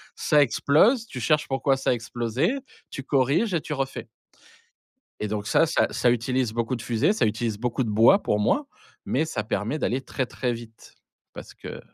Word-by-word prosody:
ça 150 -2 +3
explose, 200 - +3
tu 125 - -7
cherches 150 +5 +1
pourquoi 135 0 +1
ça 135 - -1
a - - +4
explosé, 120 - -1 0.4
tu 135 - -5
corriges 140 - +1
et 160 - 0
tu 150 - -5
refais 135 -1 -4 1.1
et 105 - -2
donc 105 0 -3
ça 165 - +3
ça - - +2
ça 120 - +2
utilise 120 0 0
beaucoup 115 +2 -1
de 115 - -8
fusées, 120 - +1
ça 215 - +1
utilise 110 -1 -2
beaucoup 125 +2 -1
de 110 - -3
bois, 115 - +5
pour 105 - 0
moi, 280 - +1 0.4
mais 150 +5 0
ça 105 -8 -3
permet 110 +6 -2
d'aller 130 -1 -1
très, 130 -1 -3
très 125 -1 -2
vite 115 -1 -12 0.4
parce - - -10
que - - -9
125 Hz, 190 wpm, -25 LUFS, 115-145 Hz, 1.1 s, bois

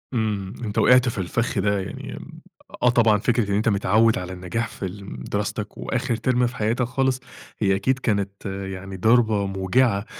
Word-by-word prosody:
إمم، 105 -5 -1
أنت 105 -3 -4
وقعت 125 0 +5
في 115 - -6
الفخ 100 +4 -1
ده 100 +1 +1
يعني، 95 - -6 0.6
آه، 125 - +6
طبعًا 115 -3 +4
فكرة 115 0 0
إن - - +2
أنت 110 +3 +2
متعود 110 +2 +3
على 90 0 -5
النجاح 95 +6 -3
في 100 - -7
الم 95 -5 -7 0.2
دراستك - - -3
وآخر 115 - -1
ترم 125 +2 +1
في 120 - -7
حياتك 115 +2 0
خالص، 130 +1 0 0.4
هي 95 -3 +3
أكيد 130 +7 0
كانت 100 -5 -2
يعني 95 -1 -5
ضربة 110 0 +3
موجعة، 100 +3 +1
105 Hz, 170 wpm, -23 LUFS, 95-120 Hz, 0.6 s, آه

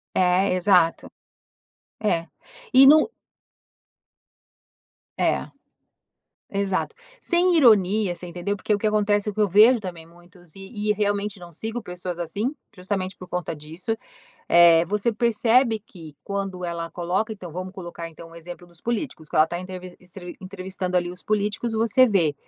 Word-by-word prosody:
É, 180 +1 +3
exato. 180 -3 +2 0.9
É. 175 -6 0 0.5
E 270 +1 +8
no 310 +8 +7 2.1
É, - - +1 1.0
exato. 195 -1 -2 0.2
Sem 350 0 +2
ironia, 210 - +4
você 180 - -7
entendeu? 175 +4 -3
Porque 205 +2 -1
o - - +2
que 215 - 0
acontece 210 0 +1
é - - -3
o - - -17
que 215 - 0
eu 210 - +4
vejo 220 +6 +6
também 175 -5 -8
muitos 175 0 -17
e 205 +2 -5
e 210 - +5
realmente 205 -1 -1
não 175 -1 -12
sigo 225 +7 -4
pessoas 180 -2 -6
assim, 200 - -2 0.2
justamente 185 0 -3
por 185 - -10
conta 180 -2 -3
disso. 160 +9 -4 0.5
Eh, 170 -1 +7
você 210 +4 0
percebe 230 +1 +2
que 165 -8 -13
quando 195 -2 -4
ela 170 -1 -4
coloca, 185 +6 -2
então 180 -6 -9
vamos 185 +2 -6
colocar 175 -3 -7
então 165 +1 -13
o 165 - -14
exemplo 175 +1 -10
dos 170 -2 -17
políticos 235 - -4
que - - -4
ela 155 +1 +6
tá 175 +1 -4
entrevis 185 -1 -8
entre 180 0 -11
entrevistando 185 -1 -4
ali 175 0 0
os 180 - -11
políticos. 210 +2 -1
Você 230 +3 +4
vê 170 -9 +2
185 Hz, 160 wpm, -24 LUFS, 175-210 Hz, 2.1 s, E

